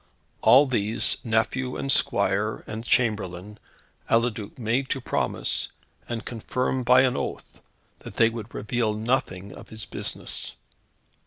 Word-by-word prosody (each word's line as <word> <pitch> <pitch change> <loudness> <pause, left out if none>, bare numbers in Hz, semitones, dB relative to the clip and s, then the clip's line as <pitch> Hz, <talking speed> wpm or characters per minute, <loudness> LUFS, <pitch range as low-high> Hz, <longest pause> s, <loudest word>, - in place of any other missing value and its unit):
All 135 +3 +7
these, 110 -4 +1
nephew 120 +3 0
and 135 - -1
squire 100 -1 +1
and 110 +1 -6
chamberlain, 105 -4 0 0.5
Eliduc 115 -3 0
made 125 +3 0
to 135 - 0
promise, - - 0 0.4
and 115 -1 -4
confirm 125 +2 -2
by 125 +1 +6
an 130 -2 +2
oath, - - -5 0.4
that - - -10
they 115 0 +4
would 115 -1 -7
reveal 110 0 -1
nothing 105 -4 -1
of 105 - -12
his 110 -3 -7
business. 90 - -3
115 Hz, 130 wpm, -26 LUFS, 105-125 Hz, 0.5 s, All